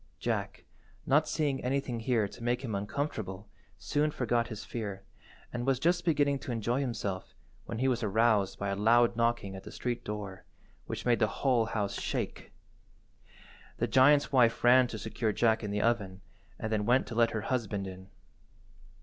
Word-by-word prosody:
Jack, - - -3 0.4
not 150 +3 +3
seeing 150 -3 -1
anything 130 -2 -1
here 115 -2 +1
to 115 - -12
make 120 +2 0
him 115 -5 -4
uncomfortable, 105 -2 -3 0.3
soon 145 - 0
forgot 120 -4 0
his 110 -3 -7
fear, 100 -4 -5 0.5
and 120 0 -2
was 135 0 +2
just 175 +6 +1
beginning 145 -4 +2
to 130 - -6
enjoy 120 +2 0
himself 105 -8 -4 0.3
when 115 - -4
he 130 +3 +1
was 125 -2 +1
aroused 110 -2 +2
by 100 - -2
a 100 - -1
loud 115 +3 +4
knocking 115 -4 0
at 95 - -8
the - - -9
street–door, 105 -6 -4 0.4
which - - -5
made 120 -1 +3
the 110 - +3 0.2
whole 125 -5 +3
house 105 -3 -2
shake. - - -4 1.3
The - - +1
giant's 145 +3 +5
wife 120 -4 +3
ran 125 +1 +6
to 115 - -6
secure 110 +1 -2
Jack 110 +1 +2
in 105 - -3
the 105 0 -1
oven 100 -5 0 0.4
and 110 - -4
then 105 -1 0
went 125 +2 +4
to - - -7
let 115 0 +3
her 110 - -3
husband 105 -5 -2
in. 95 0 -9
115 Hz, 175 wpm, -30 LUFS, 105-130 Hz, 1.3 s, ran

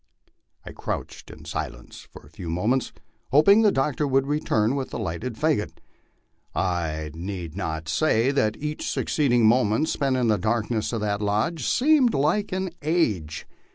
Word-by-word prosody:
I - - -8
crouched - - -6
in - - -12
silence - - -6
for - - -13
a - - -17
few 85 0 -7
moments, 110 +10 0 0.4
hoping 155 - +6
the 210 -2 +5
doctor 145 0 0
would 135 0 +2
return 135 -5 +1
with 135 -2 -3
the - - -5
lighted 100 +9 -4
fagot. 150 -6 0 0.8
I 80 -4 -1
need 85 -1 -6
not 80 -4 -4
say 115 - +2
that 110 -6 +1
each 150 +1 -4
suc - - -2
ceeding 120 -6 +2
moment 115 +5 +3
spent 135 -3 0
in 125 -2 +1
the 105 -2 +2
darkness 110 +2 -1
of 115 -3 -2
that 105 -1 -1
lodge 110 +9 0
seemed 270 -3 +3
like 160 +9 +1
an 190 -1 -2
age. 110 - 0
120 Hz, 160 wpm, -25 LUFS, 100-150 Hz, 0.8 s, hoping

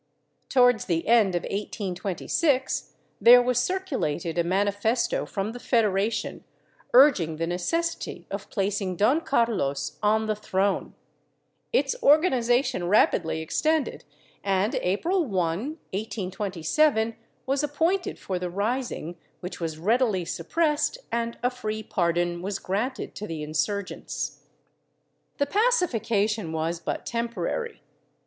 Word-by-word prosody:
Towards 245 -4 +4
the 165 -2 -1
end 215 -5 +4
of 175 - -1
1826 205 - -1 0.3
there 245 +1 +9
was 245 0 +2
circulated 250 - -1
a - - +3
manifesto 205 +6 0
from 200 +2 -3
the 245 - -8
Federation 215 -3 0 0.5
urging 245 - +6
the 165 +2 -2
necessity 330 - -2
of - - -5
placing 195 -2 -1
Don 240 - +3
Carlos 230 - 0
on 220 +1 +2
the 215 0 0
throne; 200 -1 -1 0.8
its - - +2
organization 255 - +3
rapidly 165 -5 +2
extended, 310 - 0 0.4
and 195 +2 +1
April 335 - +1
1, 280 - -6
1827, 205 - -1 0.3
was 275 +1 +1
appointed 330 +6 0
for 185 -2 -4
the 180 0 -3
rising, 200 -3 -2 0.2
which 180 0 -7
was 160 -2 -3
readily 210 0 +1
suppressed 300 - 0
and 235 0 -2
a 245 - +2
free 220 -3 -4
pardon 175 -2 0
was 195 +2 -3
granted 225 +9 -3
to 210 - -6
the 160 -2 -5
insurgents. 155 +6 -3 1.0
The 285 - +2
pacification 230 - +1
was 160 +1 -2
but 165 - -4
temporary. 235 - -3
215 Hz, 115 wpm, -26 LUFS, 180-255 Hz, 1.0 s, there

